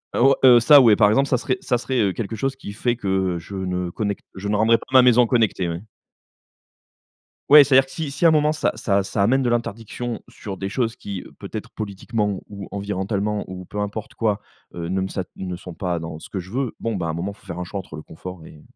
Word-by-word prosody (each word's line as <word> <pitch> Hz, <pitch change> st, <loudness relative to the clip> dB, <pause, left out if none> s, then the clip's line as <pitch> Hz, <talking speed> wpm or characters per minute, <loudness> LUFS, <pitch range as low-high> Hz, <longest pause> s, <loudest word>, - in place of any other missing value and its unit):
Heu, -, -, 0 dB
o, 135 Hz, +2 st, +6 dB
heu, 125 Hz, -2 st, +9 dB
ça 145 Hz, +4 st, +8 dB
ouais, 115 Hz, -4 st, +6 dB
par 105 Hz, -1 st, +5 dB
exemple, 135 Hz, +6 st, +3 dB
ça 125 Hz, -, +3 dB
serait 125 Hz, -, -1 dB
ça 130 Hz, -10 st, +1 dB
serait, 130 Hz, +1 st, -2 dB
heu, 100 Hz, -2 st, +2 dB
quelque 115 Hz, +1 st, -4 dB
chose 135 Hz, +5 st, -2 dB
qui 115 Hz, -6 st, -9 dB
fait 120 Hz, +3 st, 0 dB
que 95 Hz, -5 st, -1 dB
je 90 Hz, +4 st, -9 dB
ne 90 Hz, -1 st, -2 dB
connecte, 100 Hz, +1 st, -3 dB
je 95 Hz, +1 st, -5 dB
ne 105 Hz, -, +1 dB
rendrai 110 Hz, +2 st, +4 dB
pas -, -, -13 dB
ma 130 Hz, -, +9 dB
maison 125 Hz, -1 st, +5 dB
connectée, 110 Hz, -7 st, +1 dB
ouais. 85 Hz, +1 st, -4 dB, 1.7 s
Ouais, 150 Hz, 0 st, +10 dB
c'est-à-dire 135 Hz, -1 st, +4 dB
que -, -, -15 dB
si 155 Hz, -2 st, -4 dB
si 140 Hz, -, -1 dB
à -, -, +10 dB
un -, -, +6 dB
moment 150 Hz, -1 st, +3 dB
ça 155 Hz, -, 0 dB
ça 100 Hz, -3 st, +1 dB
ça 100 Hz, +1 st, -1 dB
amène 130 Hz, +6 st, +3 dB
de 125 Hz, -, +1 dB
l'interdiction 115 Hz, 0 st, -3 dB
sur 100 Hz, -2 st, -7 dB
des 95 Hz, +1 st, -4 dB
choses 115 Hz, +1 st, -1 dB
qui, 100 Hz, -3 st, -6 dB, 0.2 s
peut-être -, -, -7 dB
politiquement 105 Hz, 0 st, -3 dB
ou 100 Hz, -2 st, -8 dB
environnementalement, 100 Hz, +1 st, -2 dB
ou 90 Hz, 0 st, -7 dB
peu 105 Hz, -, -6 dB
importe 105 Hz, +1 st, -4 dB
quoi, 110 Hz, -3 st, 0 dB, 0.4 s
heu, 85 Hz, -1 st, -4 dB
ne 95 Hz, +2 st, -1 dB
me 95 Hz, -, -1 dB
sa 95 Hz, 0 st, -3 dB
ne 90 Hz, -1 st, -5 dB
sont 90 Hz, 0 st, -9 dB
pas 90 Hz, 0 st, -2 dB
dans 80 Hz, -1 st, -6 dB
ce -, -, -12 dB
que -, -, -5 dB
je 90 Hz, +1 st, -9 dB
veux, 130 Hz, 0 st, -2 dB
bon, 115 Hz, -1 st, -2 dB
bah, 85 Hz, -3 st, -2 dB
à -, -, -2 dB
un -, -, -2 dB
moment 85 Hz, +5 st, -3 dB
il -, -, -24 dB
faut -, -, -22 dB
faire 85 Hz, -1 st, -6 dB
un 90 Hz, -, -3 dB
choix 100 Hz, +3 st, -5 dB
entre 90 Hz, -4 st, -9 dB
le 75 Hz, -, -8 dB
confort 90 Hz, 0 st, -10 dB
et 75 Hz, -, -14 dB
105 Hz, 255 wpm, -22 LUFS, 95-120 Hz, 1.7 s, Ouais